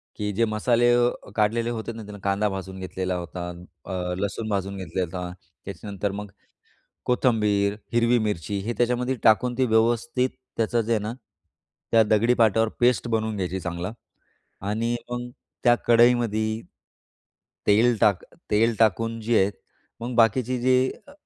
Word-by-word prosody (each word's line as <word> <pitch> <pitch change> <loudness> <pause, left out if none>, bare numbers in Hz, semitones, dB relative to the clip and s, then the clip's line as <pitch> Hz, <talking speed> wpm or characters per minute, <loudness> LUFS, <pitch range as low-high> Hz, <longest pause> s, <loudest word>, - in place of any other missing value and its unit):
की 105 0 -2
जे 115 +4 +2
मसाले 120 +2 +2
अ, 120 -4 0
काढलेले 115 +2 +1
होते 115 -1 -4
ना, 115 - -8
त्याला 105 0 -10
कांदा 100 +1 +1
भाजून 95 0 -6
घेतलेला 95 0 -3
होता, 90 0 -5 0.4
अ, 90 -1 -3
लसूण 105 +2 -3
भाजून 100 -1 -2
घेतलेला 95 0 -2
होता, 90 0 -5 0.3
त्याच्यानंतर 100 +1 -4
मग 105 0 -7 0.7
कोथिंबीर, 105 -5 +2 0.2
हिरवी 120 +1 +3
मिरची 105 -3 -2
हे 120 - -1
त्याच्यामध्ये 125 +2 +1
टाकून 120 +3 +4
ती 130 - +3
व्यवस्थित 120 +3 +2 0.3
त्याचं 115 +1 +1
जे 115 - -4
आहे 110 - +2
ना, 110 +2 -3 0.8
त्या 115 -1 +6
दगडी 110 +3 +3
पाटावर 115 -2 +3
पेस्ट 120 -1 +3
बनवून 110 -1 -1
घ्यायची 95 -1 -2
चांगला 90 +2 -4 0.8
आणि 115 +3 0 0.2
मग 120 0 -4 0.3
त्या 120 0 +6
कढईमध्ये 115 -2 +3 1.1
तेल 115 +4 +5
टाक 100 -4 +3 0.3
तेल 115 +2 +3
टाकून 115 +1 +2
जे 115 +1 +2
आहेत, 95 +2 +2 0.5
मग 120 +1 -4
बाकीची 120 +2 +3
जी 130 +1 +3 0.2
अ, - - -13
110 Hz, 145 wpm, -25 LUFS, 100-120 Hz, 1.1 s, त्या